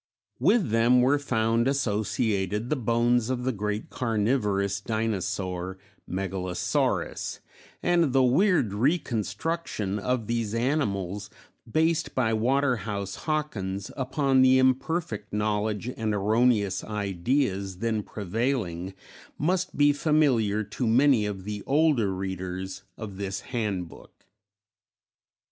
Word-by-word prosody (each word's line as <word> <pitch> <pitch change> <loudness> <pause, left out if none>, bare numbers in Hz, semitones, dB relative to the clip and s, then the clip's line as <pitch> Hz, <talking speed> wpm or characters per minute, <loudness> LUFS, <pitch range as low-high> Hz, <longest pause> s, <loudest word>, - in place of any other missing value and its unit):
With 185 - +3
them 120 +2 +4
were 140 +3 +3
found 115 -3 +1
associated 105 -4 0
the - - +3
bones 120 -1 +1
of 125 -1 -1
the 130 - +1
great 105 -1 -3
carnivorous 105 -4 0
dinosaur 95 -4 -2 0.3
Megalosaurus; 95 -1 -1 0.4
and 170 -5 +3
the 135 0 +4
weird 135 - +3
reconstructions 120 - -1
of 125 0 -1
these 115 -1 -2
animals, 105 - -1 0.4
based 160 +2 +1
by 120 -4 +2
Waterhouse 110 -5 0
Hawkins 105 -11 -3
upon 135 0 +2
the 130 0 +6
imperfect 130 -3 0
knowledge 105 +1 -1
and 110 -2 -1
erroneous 105 -1 +2
ideas 100 -1 -1
then 110 +1 -1
prevailing, 100 -3 -2 0.4
must 185 +4 0
be 145 0 +5
familiar 135 -9 +2
to 110 +4 -3
many 120 -2 +4
of 95 -2 -5
the 105 +1 -5
older 140 -8 +3
readers 95 0 -4 0.2
of 105 -4 -7
this 95 -1 -3
handbook. 105 -8 -5
110 Hz, 105 wpm, -27 LUFS, 100-130 Hz, 0.4 s, the